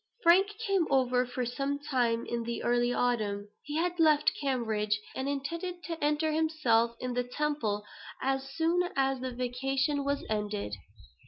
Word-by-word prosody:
Frank 365 +3 +6 0.2
came 390 -5 +2
over 255 -2 +3
for 250 0 -2
some 275 +4 -2
time 245 -5 0
in 235 0 -2
the 235 0 -4
early 240 0 +2
autumn. 210 -5 0
He 295 - -6
had 350 +1 0
left 305 -2 +5
Cambridge, 220 -6 0 0.2
and 265 +1 -2
intended 335 +6 -4
to 330 -3 -5
enter 300 +1 +2
himself 305 -8 +2
at 250 -1 -3
the 245 0 0
Temple 245 -6 -1 0.3
as 270 0 -1
soon 340 +4 +1
as 270 -1 +1
the 260 - -2
vacation 270 +4 -1
was 280 0 -1
ended. 210 - -2
270 Hz, 155 wpm, -30 LUFS, 240-300 Hz, 0.3 s, Frank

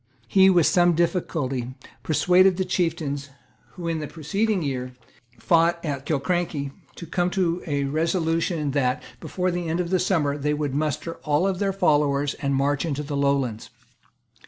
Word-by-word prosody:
He, 190 +9 +5
with 175 -4 +4
some 175 -1 +4
difficulty, 135 -7 -1 0.3
persuaded 180 +3 +3
the 190 - 0
chieftains, 160 -6 -2 0.4
who 175 - -8
had, 165 - 0
in 160 - -2
the 150 - -4
preceding 190 +6 -1
year, 125 -3 -3 0.4
fought 170 +7 +3
at 140 -2 -4
Killiecrankie, 150 -1 -1 0.2
to 170 - -8
come 175 +2 0
to 180 -2 0
a 145 -2 0
resolution 165 +1 0
that, 130 -2 0 0.2
before 185 0 -2
the 175 -1 -3
end 165 +2 -1
of 175 0 -2
the 185 - +3
summer, 155 -6 0
they 150 +1 0
would 145 -2 -2
muster 155 +3 -2
all 155 +6 +1
their 195 +1 -1
followers 145 -6 +2
and 140 -1 0
march 140 +1 +1
into 150 -3 -2
the 145 0 -4
Lowlands. 140 -5 0
155 Hz, 160 wpm, -24 LUFS, 140-175 Hz, 0.4 s, He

